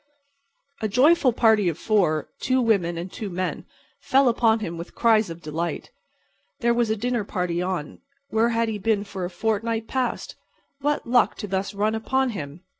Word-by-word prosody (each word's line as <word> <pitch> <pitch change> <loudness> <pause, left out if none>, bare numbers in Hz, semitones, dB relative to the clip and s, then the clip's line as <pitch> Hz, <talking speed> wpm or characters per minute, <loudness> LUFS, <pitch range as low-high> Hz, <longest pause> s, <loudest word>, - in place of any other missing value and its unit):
A 215 - +1
joyful 260 +5 +4
party 220 -5 +3
of 165 - -4
four—two 205 - 0
women 195 -8 +1
and 175 +2 -5
two 210 - -5
men—fell 185 - -1
upon 230 -1 +3
him 170 -6 -4
with 170 +2 -9
cries 220 -4 +3
of 165 0 -9
delight. 160 +3 -4 0.7
There 235 0 +3
was 235 -1 +1
a 220 - +1
dinner 240 +1 -1
party 180 -3 -2
on—where 220 - -2
had 230 0 +1
he 215 -2 -3
been 205 0 +1
for 195 -3 -5
a - - -4
fortnight 225 +4 -1
past?—what 275 +2 -4
luck 245 -1 +3
to 205 - -6
thus 195 +1 -2
run 210 +2 +1
upon 260 +4 0
him! 150 -4 -7
215 Hz, 160 wpm, -24 LUFS, 180-235 Hz, 0.7 s, joyful